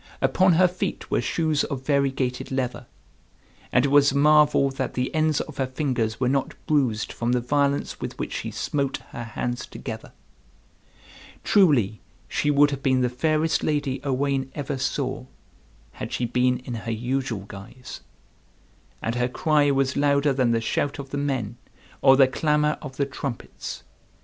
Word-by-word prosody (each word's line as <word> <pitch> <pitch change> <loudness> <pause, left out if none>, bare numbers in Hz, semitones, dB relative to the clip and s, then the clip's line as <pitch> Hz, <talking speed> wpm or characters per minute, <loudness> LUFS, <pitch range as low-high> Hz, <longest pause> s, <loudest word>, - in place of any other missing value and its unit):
Upon 185 -1 +3
her 180 +3 +5
feet 180 +1 -4
were - - +2
shoes 155 -3 0
of 135 -3 -5
variegated 135 -3 0
leather. 130 -2 -2 0.8
And - - +3
it - - +1
was 145 0 +5
a 140 - -1
marvel 150 -1 +5
that 130 -1 -4
the 125 0 -1
ends 155 -2 +2
of - - -8
her 135 - 0
fingers 125 -5 -1
were 130 - +1
not 135 +1 0
bruised 130 -8 +1
from 120 +1 -1
the 125 - +2
violence 140 +3 0
with - - -5
which - - -4
she - - -3
smote 140 -2 -2
her 120 - -6
hands 120 +1 -4
together. 110 -3 -8 1.3
Truly 135 - +3 0.3
she 150 - 0
would 145 0 +5
have 140 -1 -4
been 130 -1 +2
the 125 - +2
fairest 155 +5 +1
lady 145 -3 -1
Owain 135 -1 -1
ever 140 -2 -3
saw, 130 0 -2 0.6
had - - -7
she 125 - -1
been 125 +1 +2
in 125 - -5
her 115 0 -4
usual 120 -1 -2
guise. 100 +6 -10 1.0
And 115 - -1
her 125 0 +1
cry 150 +2 +2
was 135 -1 +1
louder 140 0 +3
than 130 -2 +2
the 115 -1 +1
shout 140 +5 -1
of 140 -1 -8
the 145 - -2
men 125 -6 -2 0.4
or 135 -1 +6
the 135 -1 +7
clamor 150 +2 +1
of 135 -3 -8
the 140 - +1
trumpets. 135 -2 -6
135 Hz, 165 wpm, -24 LUFS, 125-145 Hz, 1.3 s, the